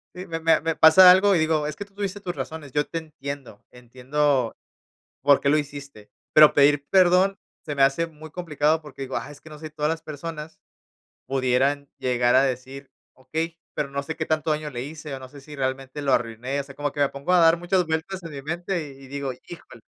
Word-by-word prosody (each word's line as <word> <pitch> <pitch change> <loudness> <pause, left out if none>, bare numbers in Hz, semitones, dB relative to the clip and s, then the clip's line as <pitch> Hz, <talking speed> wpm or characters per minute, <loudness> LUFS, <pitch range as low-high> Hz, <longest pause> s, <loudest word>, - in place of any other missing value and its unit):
Sí, 180 +1 -8
me 165 -1 -4
me 165 0 +3
me 165 0 -1
pasa 180 +4 +8
algo 195 +2 +5
y 170 - +2
digo: 155 -1 +1
"Es 150 - -5
que 200 - -6
tú 200 - -28
tuviste 200 0 -4
tus 180 -2 -5
razones, 155 -3 -7
yo 145 0 +1
te 165 - -5
entiendo, 140 -8 -8
entiendo 130 +1 -1 0.7
por 140 -1 +5
qué 140 - 0
lo 150 - +4
hiciste", 140 -7 -8 0.2
pero 155 -1 +7
pedir 145 0 +4
perdón 185 +1 +4 0.3
se 150 - -4
me 140 - +2
hace 135 +5 +3
muy 160 -1 -13
complicado 155 -2 0
porque 140 -2 -10
digo: 135 0 -4
"Ah, 145 - -5
es 145 - -13
que 155 - -15
no 150 - -10
sé 155 - -8
si 155 - -10
todas 150 0 -1
las 165 0 -3
personas 155 +1 -8 0.7
pudieran 135 +2 0
llegar 125 -1 +1
a 130 - +6
decir: 135 +1 -4 0.2
'Okey', 160 +6 -4 0.2
pero 140 -2 -3
no 140 0 -3
sé 160 +3 -6
qué 160 - -2
tanto 155 0 0
daño 150 0 -2
le 120 -3 -5
hice 150 0 -7
o - - -6
no 130 - -11
sé 140 +2 -13
si 150 +2 -12
realmente 135 +1 -3
lo 135 -2 +2
arruiné", 125 +4 -2
o - - -2
sea, 140 0 -13
como 145 0 -3
que 145 - -5
me 140 - +4
pongo 140 +6 -3
a 175 - +6
dar 165 0 +5
muchas 180 0 0
vueltas 165 +4 -3
en 165 - -8
mi 140 -2 -8
mente 170 +1 -3
y 135 - -15
y 130 - -13
digo: 140 -1 -4 0.2
"Híjole". 165 -8 -12
150 Hz, 235 wpm, -24 LUFS, 135-165 Hz, 0.7 s, pasa